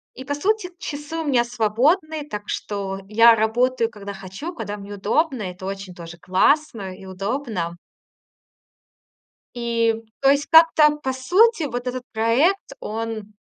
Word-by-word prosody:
И, 260 Hz, -, -9 dB
по 285 Hz, -, -2 dB
сути, 375 Hz, +6 st, 0 dB
часы 295 Hz, 0 st, -6 dB
у 325 Hz, -, -3 dB
меня 255 Hz, -5 st, +3 dB
свободные, 285 Hz, -, 0 dB
так 210 Hz, -6 st, -5 dB
что 195 Hz, -2 st, -4 dB
я 230 Hz, +2 st, +6 dB
работаю, 230 Hz, +2 st, +1 dB
когда 205 Hz, -3 st, -8 dB
хочу, 195 Hz, -, -7 dB
когда 210 Hz, -, -5 dB
мне 200 Hz, 0 st, -9 dB
удобно. 245 Hz, -, 0 dB
Это 180 Hz, 0 st, -7 dB
очень 195 Hz, -1 st, -6 dB
тоже 170 Hz, -1 st, -10 dB
классно 195 Hz, -, +1 dB
и 190 Hz, -, -13 dB
удобно. 195 Hz, -2 st, -3 dB, 1.8 s
И 230 Hz, -1 st, +1 dB, 0.3 s
то 270 Hz, -, +5 dB
есть 285 Hz, +1 st, +1 dB
как-то, 320 Hz, -2 st, +6 dB
по 265 Hz, -3 st, -3 dB
сути, 360 Hz, -, +3 dB
вот 245 Hz, -3 st, -4 dB
этот 250 Hz, 0 st, -3 dB
проект, 260 Hz, -, +1 dB
он, 220 Hz, -1 st, -5 dB
235 Hz, 140 wpm, -22 LUFS, 205-290 Hz, 1.8 s, я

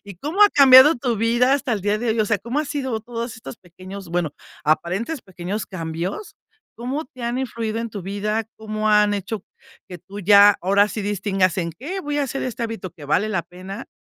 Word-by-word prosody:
Y, 200 Hz, -1 st, -10 dB
¿cómo 315 Hz, -, +1 dB
ha 415 Hz, -, +9 dB
cambiado 275 Hz, +2 st, +8 dB
tu 240 Hz, -2 st, -1 dB
vida 240 Hz, +4 st, +3 dB
hasta 280 Hz, -3 st, -1 dB
el 215 Hz, -, -1 dB
día 205 Hz, +2 st, 0 dB
de 235 Hz, -1 st, -1 dB
hoy?, 220 Hz, -, +1 dB
o 215 Hz, -, +3 dB
sea, 220 Hz, 0 st, +1 dB
¿cómo 240 Hz, +9 st, -2 dB
ha -, -, -2 dB
sido 270 Hz, -6 st, -3 dB
todos 235 Hz, +1 st, -5 dB
estos 225 Hz, -, -9 dB
pequeños?, 185 Hz, +1 st, -11 dB
bueno, 175 Hz, -3 st, -1 dB, 0.3 s
aparentes 185 Hz, -, 0 dB
pequeños 190 Hz, +3 st, -5 dB
cambios, 170 Hz, -, -5 dB, 0.4 s
¿cómo 260 Hz, +7 st, -3 dB
te 255 Hz, -1 st, -13 dB
han 240 Hz, +2 st, -1 dB
influido 230 Hz, -3 st, -3 dB
en 230 Hz, 0 st, -4 dB
tu 200 Hz, -2 st, -6 dB
vida? 210 Hz, +3 st, -2 dB
¿Cómo 215 Hz, 0 st, -3 dB
han 210 Hz, -1 st, +4 dB
hecho 200 Hz, +1 st, -4 dB, 0.5 s
que 180 Hz, -1 st, -8 dB
tú 195 Hz, +3 st, -10 dB
ya 205 Hz, +1 st, +7 dB
ahora 200 Hz, +3 st, +3 dB
sí 210 Hz, -, -4 dB
distingas 195 Hz, -2 st, 0 dB
en 170 Hz, -2 st, -2 dB
qué 300 Hz, -, -6 dB
voy 295 Hz, -3 st, -3 dB
a -, -, +2 dB
hacer 270 Hz, 0 st, -3 dB
este 240 Hz, -2 st, -4 dB
hábito 225 Hz, -5 st, -4 dB
que 150 Hz, -, -13 dB
vale 180 Hz, +9 st, +1 dB
la 190 Hz, -5 st, -1 dB
pena 190 Hz, +5 st, -9 dB
215 Hz, 215 wpm, -22 LUFS, 190-245 Hz, 0.5 s, ha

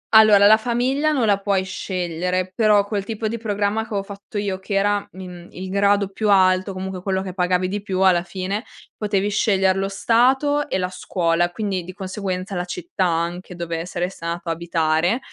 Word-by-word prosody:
Allora 215 Hz, -2 st, +8 dB
la 215 Hz, +1 st, +8 dB
famiglia 250 Hz, +6 st, 0 dB
non 265 Hz, -6 st, +1 dB
la 200 Hz, -2 st, +3 dB
puoi 195 Hz, -1 st, 0 dB
scegliere, 185 Hz, -1 st, -3 dB
però 210 Hz, -3 st, +4 dB
quel 200 Hz, -2 st, -2 dB
tipo 220 Hz, +1 st, -3 dB
di 230 Hz, +2 st, -3 dB
programma 210 Hz, 0 st, -1 dB
che 220 Hz, -, -7 dB
avevo 200 Hz, -2 st, -2 dB
fatto 200 Hz, +1 st, -9 dB
io 195 Hz, -2 st, -2 dB
che 200 Hz, +1 st, -4 dB
era, 205 Hz, +1 st, +1 dB
mhmm, 180 Hz, -2 st, -10 dB
il 185 Hz, +1 st, -7 dB
grado 200 Hz, +1 st, +2 dB
più 210 Hz, +2 st, -2 dB
alto, 190 Hz, 0 st, +4 dB
comunque 185 Hz, 0 st, -5 dB
quello 190 Hz, 0 st, -1 dB
che 185 Hz, -, -6 dB
pagavi 180 Hz, 0 st, +1 dB
di 200 Hz, +2 st, -3 dB
più 190 Hz, -2 st, -3 dB
alla 185 Hz, -2 st, +5 dB
fine, 190 Hz, +4 st, -4 dB, 0.3 s
potevi 205 Hz, -1 st, 0 dB
scegliere 190 Hz, -2 st, +2 dB
lo 195 Hz, -, -1 dB
stato 265 Hz, +8 st, +2 dB
e -, -, 0 dB
la 180 Hz, -1 st, -1 dB
scuola. 175 Hz, -1 st, 0 dB
Quindi 195 Hz, -2 st, -3 dB
di 185 Hz, +2 st, -9 dB
conseguenza 190 Hz, 0 st, -4 dB
la 180 Hz, -1 st, -2 dB
città 180 Hz, +1 st, -3 dB
anche 175 Hz, +2 st, -2 dB
dove 170 Hz, 0 st, -4 dB
saresti 180 Hz, 0 st, -4 dB
andata 170 Hz, 0 st, -3 dB
a -, -, +1 dB
abitare, 165 Hz, +4 st, 0 dB
190 Hz, 190 wpm, -21 LUFS, 180-205 Hz, 0.3 s, Allora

